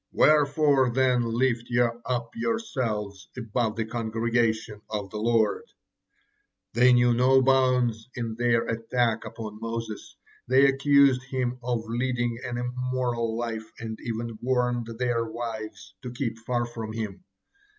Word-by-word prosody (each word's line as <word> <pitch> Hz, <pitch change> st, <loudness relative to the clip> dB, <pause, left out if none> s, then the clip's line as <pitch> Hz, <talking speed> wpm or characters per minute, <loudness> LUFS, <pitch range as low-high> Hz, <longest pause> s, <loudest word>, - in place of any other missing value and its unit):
Wherefore 145 Hz, -3 st, +4 dB
then 125 Hz, -2 st, +2 dB
lift 120 Hz, -2 st, +1 dB
ye 120 Hz, 0 st, +1 dB, 0.3 s
up 120 Hz, -2 st, -2 dB
yourselves 130 Hz, -, -2 dB
above 115 Hz, -1 st, -1 dB
the 115 Hz, -1 st, -2 dB
congregation 115 Hz, -1 st, -1 dB
of 105 Hz, -3 st, -4 dB
the 105 Hz, -, -4 dB
Lord?" 110 Hz, -1 st, +1 dB, 1.1 s
They 125 Hz, +2 st, +5 dB
knew 120 Hz, -1 st, +5 dB
no 130 Hz, +2 st, +5 dB
bounds 125 Hz, -3 st, +2 dB
in 115 Hz, -2 st, -3 dB
their 120 Hz, 0 st, +1 dB
attacks 115 Hz, 0 st, -1 dB
upon 110 Hz, -1 st, -8 dB
Moses, 115 Hz, -1 st, -6 dB, 0.3 s
they 130 Hz, +3 st, +5 dB
accused 135 Hz, -1 st, +4 dB
him 125 Hz, -1 st, -2 dB
of 120 Hz, -2 st, -2 dB
leading 120 Hz, 0 st, -1 dB
an 125 Hz, -2 st, -3 dB
immoral 125 Hz, -2 st, -2 dB
life 110 Hz, -2 st, -4 dB
and 110 Hz, -1 st, -6 dB
even 115 Hz, -1 st, -4 dB
warned 125 Hz, -2 st, 0 dB
their 120 Hz, -1 st, 0 dB
wives 110 Hz, -3 st, -6 dB
to 125 Hz, -, -6 dB
keep 120 Hz, -2 st, -3 dB
far 120 Hz, +1 st, -1 dB
from 115 Hz, -2 st, -6 dB
him. 110 Hz, -, -5 dB
120 Hz, 130 wpm, -26 LUFS, 115-125 Hz, 1.1 s, They